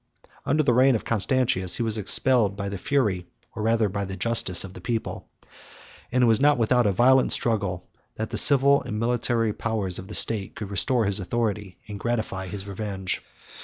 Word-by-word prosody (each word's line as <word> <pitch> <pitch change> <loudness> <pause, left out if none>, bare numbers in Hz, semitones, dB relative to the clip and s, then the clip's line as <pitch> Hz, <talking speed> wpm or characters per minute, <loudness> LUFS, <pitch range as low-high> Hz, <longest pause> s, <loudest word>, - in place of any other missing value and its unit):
Under 155 +2 +1
the 125 - +2
reign 130 +1 +4
of 110 - -4
Constantius, 110 -5 0
he - - -2
was 110 -1 -1
expelled 105 0 +2
by 100 0 -5
the 100 -2 -6
fury, 105 -11 -1 0.3
or - - -6
rather 110 0 +1
by 100 +1 -4
the 95 0 -7
justice, 100 -5 +2
of 95 -1 -10
the - - -12
people; 115 -2 -5 0.8
and 125 0 +1
it - - +5
was 115 -2 +3
not 145 -1 +3
without 120 0 +2
a - - +2
violent 130 +6 +3
struggle, 100 -6 -2 0.3
that 110 +1 -5
the 110 - -3
civil 140 0 +6
and 105 - -6
military 115 -1 0
powers 105 -6 -2
of 95 - -10
the 105 - -3
state 105 -4 +2
could 105 -3 -8
restore 110 +5 0
his 100 +1 +1
authority, 105 -1 -3
and 105 -1 -8
gratify 110 -5 -3
his 95 +1 -6
revenge. 100 -2 -5
110 Hz, 195 wpm, -24 LUFS, 100-120 Hz, 0.8 s, civil